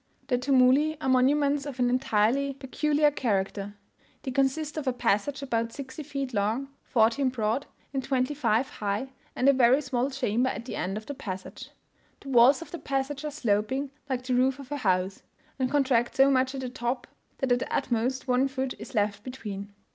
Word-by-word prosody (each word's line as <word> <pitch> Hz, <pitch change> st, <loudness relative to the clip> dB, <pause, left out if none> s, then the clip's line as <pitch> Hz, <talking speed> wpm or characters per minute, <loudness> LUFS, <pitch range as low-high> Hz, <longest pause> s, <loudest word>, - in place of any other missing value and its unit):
The 250 Hz, -2 st, +2 dB
tumuli 275 Hz, +4 st, +4 dB
are 285 Hz, -, -3 dB
monuments 280 Hz, +2 st, +3 dB
of 275 Hz, -3 st, -6 dB
an 250 Hz, -1 st, +2 dB
entirely 255 Hz, +2 st, +2 dB
peculiar 295 Hz, +2 st, +1 dB
character; 205 Hz, -5 st, -2 dB, 0.5 s
they 260 Hz, -, -3 dB
consist 275 Hz, +4 st, 0 dB
of 305 Hz, -3 st, -4 dB
a 255 Hz, -, +2 dB
passage 245 Hz, +4 st, 0 dB
about 230 Hz, -3 st, -1 dB
sixty 275 Hz, +1 st, -7 dB
feet 275 Hz, -3 st, -4 dB
long, 220 Hz, +7 st, 0 dB
fourteen 235 Hz, +4 st, +2 dB
broad, 235 Hz, +2 st, -1 dB, 0.3 s
and 270 Hz, -1 st, -1 dB
twenty 260 Hz, +1 st, 0 dB
five 245 Hz, -3 st, +1 dB
high, 210 Hz, +5 st, -3 dB, 0.3 s
and 255 Hz, -, +1 dB
a 275 Hz, -, +7 dB
very 260 Hz, +1 st, +5 dB
small 260 Hz, -2 st, -1 dB
chamber 255 Hz, -2 st, 0 dB
at 235 Hz, -, -5 dB
the -, -, -5 dB
end 190 Hz, +3 st, -2 dB
of 215 Hz, -, -7 dB
the 285 Hz, -, -5 dB
passage. 190 Hz, -9 st, -7 dB, 0.5 s
The 275 Hz, -, -9 dB
walls 260 Hz, +5 st, +6 dB
of 295 Hz, -, -16 dB
the 345 Hz, -, -6 dB
passage 275 Hz, +1 st, -2 dB
are 300 Hz, -, -2 dB
sloping, 260 Hz, 0 st, -1 dB, 0.2 s
like 255 Hz, -1 st, -1 dB
the 255 Hz, 0 st, -1 dB
roof 255 Hz, +2 st, +3 dB
of 275 Hz, -1 st, -11 dB
a 290 Hz, -, -1 dB
house, 190 Hz, -5 st, 0 dB, 0.4 s
and 255 Hz, -1 st, +1 dB
contract 260 Hz, -4 st, +2 dB
so 270 Hz, +1 st, +5 dB
much 260 Hz, 0 st, +2 dB
at 265 Hz, -, -4 dB
the 255 Hz, -, -4 dB
top, 245 Hz, 0 st, -3 dB, 0.3 s
that 265 Hz, -3 st, -1 dB
at 245 Hz, -, +4 dB
the -, -, -5 dB
utmost 255 Hz, +1 st, -1 dB
one 255 Hz, +2 st, +3 dB
foot 265 Hz, -1 st, -3 dB
is 275 Hz, -, -9 dB
left 205 Hz, -1 st, 0 dB
between. 210 Hz, -6 st, -7 dB
260 Hz, 195 wpm, -27 LUFS, 230-275 Hz, 0.5 s, a